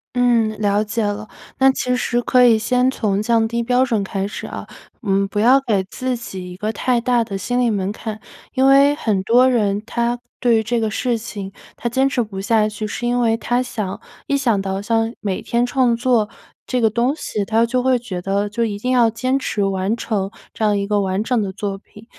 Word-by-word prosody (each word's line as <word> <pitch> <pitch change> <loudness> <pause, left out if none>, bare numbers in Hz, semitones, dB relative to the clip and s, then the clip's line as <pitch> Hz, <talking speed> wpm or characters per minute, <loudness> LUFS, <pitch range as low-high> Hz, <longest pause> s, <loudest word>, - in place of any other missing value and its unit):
嗯， 235 -3 +2
了 205 0 +2
解 215 +2 -2
了， 205 +1 -3 0.3
那 270 0 +5
其 250 -1 -1
实 240 -1 0
可 250 +1 +4
以 230 -2 +5
先 250 +3 +2
从 205 -6 -1
降 225 +1 +2
低 235 +1 -2
标 250 +2 +3
准 230 -6 0
开 195 0 -3
始 205 - -7
啊， - - -7 0.3
嗯 195 -3 +1
不 205 +1 -3
要 250 +5 +6
给 205 -7 0
自 255 +6 -3
己 190 -6 -7
一 180 - -8
个 210 +3 -2
太 245 +1 0
大 240 -1 +2
的 210 -3 -6
心 245 +5 -1
理 245 -2 +2
门 195 -2 -1
槛。 215 0 -6 0.3
因 265 0 +3
为 280 +1 +6
很 210 -9 -1
多 250 +5 +5
人 210 -4 +1
他 235 +1 -1 0.2
对 235 -3 +3
于 - - -2
这 235 +2 0
个 220 -1 -1
事 240 +1 0
情， 205 -4 -7 0.2
他 240 - -3
坚 265 +3 +2
持 275 -2 0
不 210 -4 -5
下 215 +2 +2
去， 215 0 -5
是 240 +3 -3
因 245 0 +1
为 225 -1 +3
他 245 +2 0
想 210 -5 -4 0.3
一 280 - +1
想 230 -7 +1
到 195 0 -3
像 225 +1 +1
每 195 -3 -3
天 235 +1 0
创 245 -1 +2
作 235 -3 +1 0.4
这 255 - 0
个 225 -2 +3
东 245 +5 +1
西， 215 -9 -3
他 225 +3 +2
就 250 +1 0
会 260 0 +3
觉 205 -7 -6
得 200 +2 0
就 235 +2 -1
一 210 -3 -2
定 250 +5 -2
要 240 -3 +4
坚 255 +4 -1
持 210 -5 -1
完 195 +3 -1
成 200 -5 -2 0.2
这 - - -4
样 210 -1 +3
一 200 - -1
个 205 0 +1
完 190 +2 -1
整 245 -1 +1
的 195 -2 -2
作 195 0 -4
品。 210 +2 -17
225 Hz, 245 characters per minute, -20 LUFS, 205-245 Hz, 0.4 s, 要